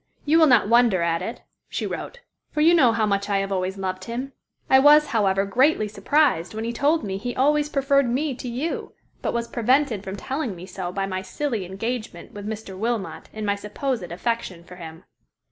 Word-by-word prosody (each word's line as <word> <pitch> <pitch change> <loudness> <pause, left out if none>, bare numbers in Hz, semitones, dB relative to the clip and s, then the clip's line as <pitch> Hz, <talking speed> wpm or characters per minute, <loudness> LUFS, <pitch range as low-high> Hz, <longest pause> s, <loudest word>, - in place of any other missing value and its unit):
"You 315 +3 +4
will 320 - +7
not 245 -6 +5
wonder 230 -6 +4
at 165 0 0
it," 225 +6 -6 0.3
she - - -3
wrote, - - -6 0.3
"for - - -4
you 330 +3 +6
know 270 -9 +5
how 225 -1 +1
much 200 0 -1
I 200 - +2
have 195 0 -2
always 190 0 -1
loved 185 -1 -4
him. 255 +4 -5 0.3
I 265 - +6
was, 295 +2 +7
however, 195 -3 +2
greatly 250 +2 +2
surprised 215 - +1
when 220 - -3
he 235 +1 -3
told 290 +6 +2
me 195 -2 -3
he 245 +3 -4
always 295 +3 +2
preferred 275 -2 +2
me 275 +4 0
to 250 +1 -7
you, 260 +8 -3 0.3
but - - -1
was 235 0 -2
prevented 240 -2 +1
from 190 0 -5
telling 260 0 -3
me 175 +1 -9
so 185 -2 -5
by 195 +1 -2
my 185 -1 -3
silly 230 -1 -3
engagement 215 0 -5
with 205 0 -8
Mr. 215 -3 -6
Wilmot 225 +1 -3
and 215 -1 -5
my 200 - +2
supposed 215 +5 -3
affection 185 -2 -3
for 180 +1 -13
him." 165 0 -10
225 Hz, 205 wpm, -24 LUFS, 195-265 Hz, 0.3 s, will